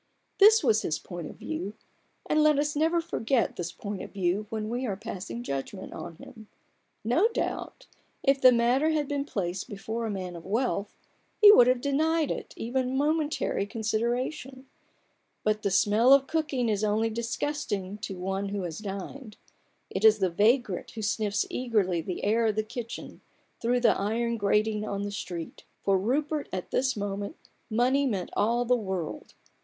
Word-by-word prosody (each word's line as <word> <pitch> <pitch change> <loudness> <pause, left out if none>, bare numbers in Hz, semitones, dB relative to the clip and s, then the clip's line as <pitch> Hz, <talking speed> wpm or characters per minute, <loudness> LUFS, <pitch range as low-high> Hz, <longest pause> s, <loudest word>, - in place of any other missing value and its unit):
This 430 +1 +7
was 220 -4 +3
his 155 - -1
point 175 -1 -7
of - - -11
view; 180 +7 -5 0.5
and 305 - +2
let 305 -1 +5
us 295 +1 0
never 325 +3 +2
forget 255 - 0
this 175 -1 -4
point 205 -2 -6
of - - -8
view 195 +2 -1
when 220 -2 -3
we 240 +3 -2
are 200 - -2
passing 215 +2 -6
judgment 140 - -5
on 170 -1 -7
him. 220 +4 -13 0.6
No 250 - +3
doubt, 465 - -4 0.4
if 275 0 +3
the 255 - +9
matter 245 +6 +3
had 305 -3 0
been 285 -1 -2
placed 190 -6 -3
before 220 +3 -4
a - - -3
man 185 -3 -4
of 170 - -9
wealth, 210 0 -1 0.5
he 415 -1 +10
would 245 - +7
have 250 -1 +3
denied 310 +3 +1
it - - -5
even 255 +2 -1
momentary 300 -8 0
consideration: 240 +5 -2 0.8
but 215 0 +1
the 200 - 0
smell 210 +6 +5
of 275 -1 +5
cooking 300 -6 -1
is 210 -1 0
only 215 +2 +1
disgusting 230 -4 -3
to 195 -2 -5
one 195 +2 -2
who 200 -1 -3
has 170 0 -5
dined; 210 +4 -7 0.5
it 190 - -3
is 220 -1 +7
the 190 -4 +1
vagrant 215 +1 +2
who 220 - -7
sniffs 205 0 0
eagerly 210 -9 0
the 180 +2 -5
air 225 +3 +2
of 215 - 0
the 215 - +1
kitchen 235 +1 -7 0.4
through 245 +2 +2
the 235 - +5
iron 230 +4 0
grating 210 +1 +1
on 200 -1 -3
the 205 - -3
street. 175 -4 -6 0.2
For 195 - +3
Rupert, 285 +9 0
at 185 -1 -5
this 260 -2 +1
moment, 200 0 -3 0.3
money 255 +5 +2
meant 195 -7 -2
all 235 +3 +2
the 250 +1 +4
world. 190 -7 -4
220 Hz, 170 wpm, -28 LUFS, 200-260 Hz, 0.8 s, he